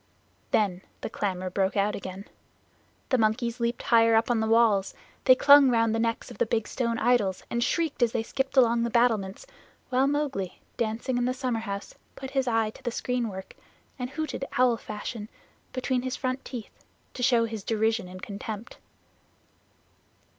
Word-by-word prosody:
Then 190 Hz, -4 st, +1 dB, 0.2 s
the -, -, -5 dB
clamor 185 Hz, -2 st, -2 dB
broke 195 Hz, +2 st, 0 dB
out 200 Hz, +1 st, +2 dB
again. 190 Hz, +1 st, -7 dB, 0.8 s
The 255 Hz, -, +2 dB
monkeys 230 Hz, +2 st, 0 dB
leaped 235 Hz, +1 st, -1 dB
higher 230 Hz, -3 st, +5 dB
up 225 Hz, +1 st, +4 dB
the 240 Hz, -, +1 dB
walls. 220 Hz, -4 st, +3 dB, 0.3 s
They 255 Hz, -, +8 dB
clung 285 Hz, 0 st, +7 dB
around 230 Hz, -2 st, +3 dB
the 225 Hz, -, 0 dB
necks 230 Hz, 0 st, -1 dB
of -, -, -12 dB
the -, -, +2 dB
big 220 Hz, -1 st, 0 dB
stone 235 Hz, -3 st, -1 dB
idols 225 Hz, -6 st, +1 dB
and 235 Hz, 0 st, +1 dB
shrieked 325 Hz, -2 st, -1 dB
as 235 Hz, -2 st, +4 dB
they 230 Hz, -, -1 dB
skipped 270 Hz, +3 st, -3 dB
along 235 Hz, -2 st, +5 dB
the 235 Hz, -, 0 dB
battlements, 225 Hz, -, +1 dB, 0.4 s
while 260 Hz, +2 st, +3 dB
Mowgli, 280 Hz, -10 st, -2 dB, 0.2 s
dancing 235 Hz, +3 st, -1 dB
in 240 Hz, -, +1 dB
the 255 Hz, +1 st, 0 dB
summerhouse, 225 Hz, -6 st, -3 dB, 0.2 s
put 265 Hz, 0 st, -7 dB
his 270 Hz, -1 st, 0 dB
eye 225 Hz, -2 st, +1 dB
to -, -, -16 dB
the -, -, -2 dB
screenwork 230 Hz, -6 st, -3 dB, 0.5 s
and 250 Hz, 0 st, -3 dB
hooted 305 Hz, 0 st, -4 dB
owl 250 Hz, -1 st, +4 dB
fashion 215 Hz, 0 st, -6 dB, 0.4 s
between 255 Hz, 0 st, -1 dB
his 255 Hz, 0 st, -3 dB
front 255 Hz, 0 st, -3 dB
teeth, 240 Hz, -4 st, -9 dB, 0.3 s
to -, -, -7 dB
show 240 Hz, -2 st, +4 dB
his 220 Hz, -3 st, -6 dB
derision 220 Hz, -1 st, 0 dB
and 185 Hz, 0 st, -10 dB
contempt. 210 Hz, +2 st, -6 dB
230 Hz, 170 wpm, -27 LUFS, 215-255 Hz, 0.8 s, They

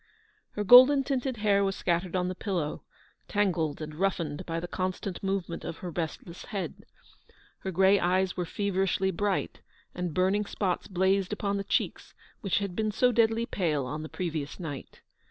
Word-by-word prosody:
Her 210 Hz, -, -2 dB
golden 255 Hz, +6 st, +8 dB
tinted 260 Hz, -2 st, -2 dB
hair 205 Hz, -2 st, +3 dB
was 195 Hz, -1 st, 0 dB
scattered 175 Hz, +1 st, -1 dB
on 180 Hz, -1 st, +1 dB
the 185 Hz, -, -2 dB
pillow, 180 Hz, -6 st, -3 dB, 0.4 s
tangled 170 Hz, -7 st, 0 dB
and 155 Hz, 0 st, -7 dB
roughened 170 Hz, -2 st, -2 dB
by 165 Hz, 0 st, -2 dB
the 175 Hz, -, -5 dB
constant 185 Hz, +1 st, -3 dB
movement 190 Hz, -3 st, -2 dB
of 165 Hz, -, -5 dB
her 180 Hz, -, -6 dB
restless 170 Hz, +1 st, -5 dB
head. 195 Hz, -, -5 dB, 0.7 s
Her 190 Hz, -, -4 dB
grey 190 Hz, +2 st, +4 dB
eyes 185 Hz, +1 st, +1 dB
were 180 Hz, -2 st, -2 dB
feverishly 190 Hz, 0 st, 0 dB
bright, 200 Hz, +2 st, -2 dB, 0.3 s
and 180 Hz, -1 st, -3 dB
burning 190 Hz, +5 st, +1 dB
spots 185 Hz, -4 st, -2 dB
blazed 190 Hz, +1 st, +1 dB
upon 200 Hz, -1 st, -1 dB
the 200 Hz, -, -2 dB
cheeks -, -, -2 dB, 0.2 s
which 195 Hz, -, 0 dB
had 200 Hz, -3 st, -2 dB
been 215 Hz, +1 st, 0 dB
so 250 Hz, +4 st, +3 dB
deadly 230 Hz, 0 st, +2 dB
pale 155 Hz, -, -1 dB
on 150 Hz, +4 st, -4 dB
the 155 Hz, -, -7 dB
previous 160 Hz, -5 st, -4 dB
night. 145 Hz, -6 st, -7 dB
190 Hz, 170 wpm, -28 LUFS, 170-200 Hz, 0.7 s, golden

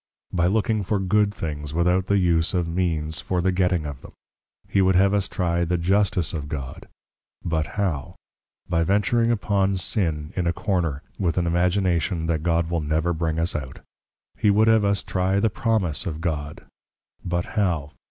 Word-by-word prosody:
By 85 Hz, -1 st, +2 dB
looking 110 Hz, +2 st, +1 dB
for 100 Hz, +2 st, 0 dB
good 100 Hz, +2 st, +2 dB
things, 75 Hz, -5 st, -5 dB
without 90 Hz, +2 st, +2 dB
the 100 Hz, -, +3 dB
use 85 Hz, -2 st, +2 dB
of 90 Hz, -2 st, 0 dB
Means 80 Hz, -3 st, -1 dB
for 90 Hz, -, -2 dB
the 95 Hz, +2 st, +2 dB
getting 90 Hz, -3 st, +1 dB
of 70 Hz, -3 st, -6 dB
them. -, -, -13 dB, 0.5 s
He 100 Hz, -, +2 dB
would 95 Hz, 0 st, +3 dB
have 95 Hz, +2 st, +4 dB
us 100 Hz, -2 st, +1 dB
trie 85 Hz, -3 st, 0 dB
the 90 Hz, +1 st, 0 dB
Justice 95 Hz, -1 st, +1 dB
of 75 Hz, -3 st, -4 dB
God; 70 Hz, -4 st, -6 dB, 0.6 s
but 80 Hz, -2 st, 0 dB
how? 85 Hz, -10 st, -2 dB, 0.5 s
By 85 Hz, -2 st, +1 dB
venturing 105 Hz, +6 st, +2 dB
upon 100 Hz, -4 st, +1 dB
Sin 80 Hz, -5 st, -1 dB
in 90 Hz, -2 st, 0 dB
a 85 Hz, -, +1 dB
Corner, 85 Hz, -8 st, -1 dB, 0.2 s
with 90 Hz, -4 st, 0 dB
an 90 Hz, -, +2 dB
Imagination 85 Hz, 0 st, +1 dB
that 80 Hz, -2 st, 0 dB
God 85 Hz, 0 st, +1 dB
will 85 Hz, -2 st, 0 dB
never 80 Hz, +3 st, 0 dB
bring 80 Hz, -1 st, -1 dB
us 85 Hz, +2 st, 0 dB
out. 65 Hz, -4 st, -5 dB, 0.5 s
He 105 Hz, -, +2 dB
would 105 Hz, +2 st, +4 dB
have 110 Hz, -1 st, +5 dB
us 100 Hz, 0 st, +1 dB
trie 95 Hz, +1 st, 0 dB
the 110 Hz, +1 st, +2 dB
Promise 100 Hz, -6 st, 0 dB
of 80 Hz, -3 st, -4 dB
God; 75 Hz, -4 st, -4 dB, 0.6 s
but 85 Hz, 0 st, -1 dB
how? 85 Hz, -9 st, 0 dB
90 Hz, 180 wpm, -24 LUFS, 80-100 Hz, 0.6 s, have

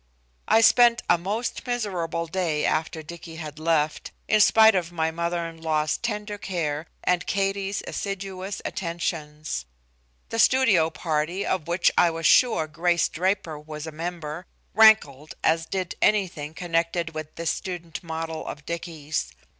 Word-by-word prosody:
I 225 Hz, -, +5 dB
spent 235 Hz, 0 st, +5 dB
a 175 Hz, -, +4 dB
most 210 Hz, +9 st, -3 dB
miserable 180 Hz, -9 st, -2 dB
day 165 Hz, -3 st, -1 dB
after 160 Hz, 0 st, -1 dB
Dicky 165 Hz, +1 st, -10 dB
had 155 Hz, -2 st, -7 dB
left, 155 Hz, -2 st, 0 dB, 0.2 s
in 215 Hz, -1 st, +4 dB
spite 220 Hz, +1 st, +7 dB
of 175 Hz, -3 st, -1 dB
my 160 Hz, -2 st, 0 dB
mother 170 Hz, +1 st, -2 dB
in 165 Hz, -1 st, -9 dB
law's 155 Hz, -2 st, +1 dB
tender 210 Hz, -3 st, -4 dB
care 160 Hz, -6 st, -3 dB, 0.2 s
and 180 Hz, -1 st, +1 dB
Katie's 195 Hz, 0 st, -1 dB
assiduous 195 Hz, -1 st, -5 dB
attentions. 155 Hz, -, -3 dB, 0.6 s
The 225 Hz, -, -3 dB
studio 220 Hz, -11 st, +4 dB
party, 160 Hz, +3 st, -2 dB
of 180 Hz, -5 st, -1 dB
which 175 Hz, +1 st, +3 dB
I 175 Hz, -, +5 dB
was 165 Hz, 0 st, -4 dB
sure 240 Hz, -10 st, +5 dB
Grace 170 Hz, +2 st, +1 dB
Draper 180 Hz, -3 st, -1 dB
was 150 Hz, 0 st, -8 dB
a 160 Hz, -, -6 dB
member, 165 Hz, 0 st, -5 dB, 0.3 s
rankled 155 Hz, -10 st, +5 dB
as 165 Hz, 0 st, +2 dB
did 185 Hz, -2 st, -3 dB
anything 175 Hz, -7 st, +1 dB
connected 170 Hz, -1 st, -1 dB
with 155 Hz, 0 st, -7 dB
this 165 Hz, -1 st, -1 dB
student 175 Hz, -4 st, -6 dB
model 160 Hz, -1 st, -5 dB
of 150 Hz, 0 st, -7 dB
Dicky's. 160 Hz, -, -4 dB
170 Hz, 145 wpm, -25 LUFS, 160-195 Hz, 0.6 s, spite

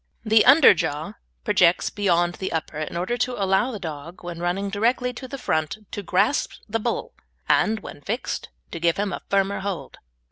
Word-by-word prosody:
The 215 Hz, 0 st, +5 dB
underjaw 200 Hz, -, +5 dB, 0.3 s
projects 180 Hz, -4 st, +3 dB
beyond 175 Hz, -4 st, +1 dB
the 190 Hz, -, -2 dB
upper 160 Hz, -1 st, -3 dB
in 155 Hz, +2 st, -4 dB
order 185 Hz, +8 st, -1 dB
to 250 Hz, +2 st, -1 dB
allow 195 Hz, +5 st, +2 dB
the 235 Hz, -, -5 dB
dog, 165 Hz, -1 st, -8 dB
when 175 Hz, -1 st, -6 dB
running 185 Hz, +3 st, -1 dB
directly 245 Hz, +4 st, +1 dB
to 260 Hz, +2 st, -8 dB
the 275 Hz, -, -6 dB
front, 155 Hz, -, -1 dB
to 205 Hz, -, -4 dB
grasp 190 Hz, +8 st, +1 dB
the 225 Hz, +1 st, -1 dB
bull, 235 Hz, +2 st, -3 dB, 0.3 s
and, 220 Hz, 0 st, +2 dB
when -, -, -10 dB
fixed, 225 Hz, -, -3 dB, 0.2 s
to 170 Hz, -, -5 dB
give 170 Hz, 0 st, +2 dB
him 200 Hz, -1 st, -1 dB
a -, -, -5 dB
firmer 200 Hz, 0 st, +1 dB
hold. 185 Hz, -9 st, -5 dB
195 Hz, 180 wpm, -24 LUFS, 170-220 Hz, 0.3 s, The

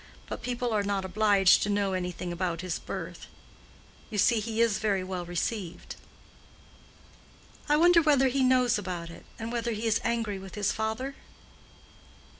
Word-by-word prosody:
But -, -, -6 dB
people 245 Hz, -1 st, -2 dB
are 210 Hz, -, +2 dB
not 200 Hz, -1 st, -1 dB
obliged 200 Hz, -1 st, +4 dB
to 205 Hz, -, 0 dB
know 200 Hz, -1 st, +1 dB
anything 180 Hz, -1 st, -3 dB
about 175 Hz, -1 st, -2 dB
his 185 Hz, -2 st, -3 dB
birth; -, -, -7 dB, 0.8 s
you 210 Hz, -, -5 dB
see, 225 Hz, +3 st, +4 dB
he 220 Hz, +1 st, -4 dB
is 230 Hz, -3 st, +3 dB
very 200 Hz, -3 st, 0 dB
well 185 Hz, -1 st, -4 dB
received." 175 Hz, 0 st, -4 dB, 1.7 s
"I 295 Hz, -, +5 dB
wonder 345 Hz, +1 st, +6 dB
whether 285 Hz, -4 st, +4 dB
he 270 Hz, +2 st, 0 dB
knows 255 Hz, -3 st, +3 dB
about 175 Hz, -4 st, -5 dB
it; -, -, -13 dB
and 225 Hz, +1 st, -5 dB
whether 235 Hz, -1 st, -1 dB
he 220 Hz, +2 st, -4 dB
is 225 Hz, -1 st, +2 dB
angry 225 Hz, -4 st, -1 dB
with 190 Hz, 0 st, -10 dB
his 205 Hz, -1 st, 0 dB
father?" 220 Hz, +6 st, -3 dB
210 Hz, 160 wpm, -28 LUFS, 190-235 Hz, 1.7 s, wonder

